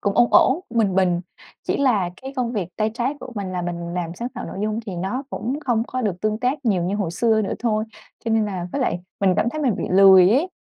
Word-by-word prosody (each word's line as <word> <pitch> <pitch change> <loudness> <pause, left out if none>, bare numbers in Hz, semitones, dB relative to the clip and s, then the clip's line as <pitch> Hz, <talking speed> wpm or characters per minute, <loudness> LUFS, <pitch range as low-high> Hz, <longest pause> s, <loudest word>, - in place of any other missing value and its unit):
cũng 200 -1 0
ổn 240 - +5
ổn, 270 +7 +5
cũng 235 - -2
bình 200 -4 +2
bình, 180 -2 +2 0.4
chỉ - - -1
là 215 -10 +2
cái 265 +1 -6
công 245 -2 -1
việc 195 -7 -2
tay 215 0 0
trái 250 +4 -1
của - - -8
mình 195 -3 -4
là 180 -1 -2
mình 170 0 -4
làm 175 -2 -3
sáng 235 +6 -4
tạo - - -7
nội - - -7
dung 215 +1 -1
thì 190 -4 -5
nó 195 +9 -2
cũng 255 +6 -3
không 240 -4 +1
có 255 - -3
được 190 -5 -2
tương 215 0 0
tác 265 +4 -1
nhiều 195 -7 +2
như 190 +4 -1
hồi 195 -6 -1
xưa 220 +4 +2
nữa 195 - -2
thôi, 215 -2 0 0.4
cho 230 - -1
nên 220 -1 +3
là 185 -3 -4
với 285 - -2
lại 175 -9 0 0.2
mình 190 -2 +3
cảm 210 +3 +2
thấy 310 - -4
mình 245 -7 +1
bị - - -3
lười 190 -1 +7
ấy. 280 - +2
215 Hz, 270 wpm, -22 LUFS, 185-240 Hz, 0.4 s, lười